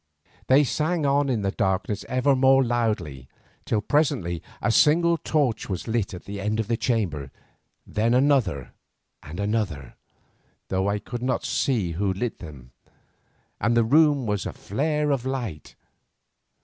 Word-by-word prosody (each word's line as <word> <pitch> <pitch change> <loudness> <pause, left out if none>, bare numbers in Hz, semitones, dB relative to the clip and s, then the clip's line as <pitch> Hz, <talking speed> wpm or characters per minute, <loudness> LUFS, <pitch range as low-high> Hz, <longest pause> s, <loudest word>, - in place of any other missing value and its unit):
They 135 +3 +6
sang 155 +3 -1
on 140 0 +2
in 115 -5 0
the 95 - 0
darkness 95 +2 -1
ever 130 +2 +2
more 135 +1 +5
loudly, 105 - -2 0.4
till 105 - 0
presently 125 - 0 0.2
a 115 - +1
single 170 +7 +4
torch 145 -10 -1
was 95 -2 -4
lit 110 -4 -1
at 90 - -11
the 100 0 -6
end 105 +2 -1
of 110 - -1
the 115 - +1
chamber, 95 - -1 0.6
then 115 +3 +1
another 125 - +1 0.5
and 80 +5 -9
another, 100 - -2 0.8
though 95 +1 0
I 100 - 0
could 120 +3 -7
not 130 +1 -1
see 110 -11 0
who 95 +4 -1
lit 115 +5 -4
them, 70 -8 -11 0.9
and 115 +2 +1
the 115 - +5
room 145 +2 +4
was 105 -2 -1
a - - -6
flare 150 +6 -1
of 135 -4 0
light. 120 - -5
115 Hz, 150 wpm, -25 LUFS, 95-135 Hz, 0.9 s, They